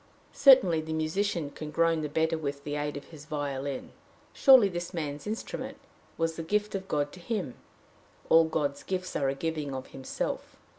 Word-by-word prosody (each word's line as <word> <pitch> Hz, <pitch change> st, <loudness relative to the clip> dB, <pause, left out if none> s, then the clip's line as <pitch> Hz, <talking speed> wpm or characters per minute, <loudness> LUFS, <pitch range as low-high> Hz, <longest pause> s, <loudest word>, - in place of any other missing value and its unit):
Certainly 195 Hz, -, +6 dB
the 160 Hz, 0 st, -5 dB
musician 160 Hz, 0 st, -1 dB
can 155 Hz, +1 st, -7 dB
groan 165 Hz, 0 st, +2 dB
the 150 Hz, -, -3 dB
better 160 Hz, +2 st, +1 dB
with 140 Hz, -3 st, -4 dB
the 145 Hz, 0 st, -3 dB
aid 145 Hz, -1 st, -2 dB
of 140 Hz, -, -10 dB
his 150 Hz, -3 st, -12 dB
violin. 140 Hz, -3 st, -4 dB, 0.4 s
Surely 260 Hz, -6 st, +7 dB
this 175 Hz, -1 st, -5 dB
man's 150 Hz, 0 st, -4 dB
instrument 220 Hz, +1 st, -5 dB, 0.4 s
was 165 Hz, 0 st, -1 dB
the -, -, -3 dB
gift 210 Hz, +5 st, 0 dB
of 190 Hz, -1 st, -4 dB
God 145 Hz, -3 st, 0 dB
to 185 Hz, -, -12 dB
him. 180 Hz, -, -3 dB, 0.7 s
All 165 Hz, 0 st, +6 dB
God's 145 Hz, -3 st, -1 dB
gifts 185 Hz, -1 st, -4 dB
are 135 Hz, -2 st, +1 dB
a 135 Hz, -, -1 dB
giving 150 Hz, -2 st, -3 dB
of 130 Hz, -, -6 dB
himself. 135 Hz, -1 st, -4 dB
160 Hz, 180 wpm, -29 LUFS, 145-175 Hz, 0.7 s, Surely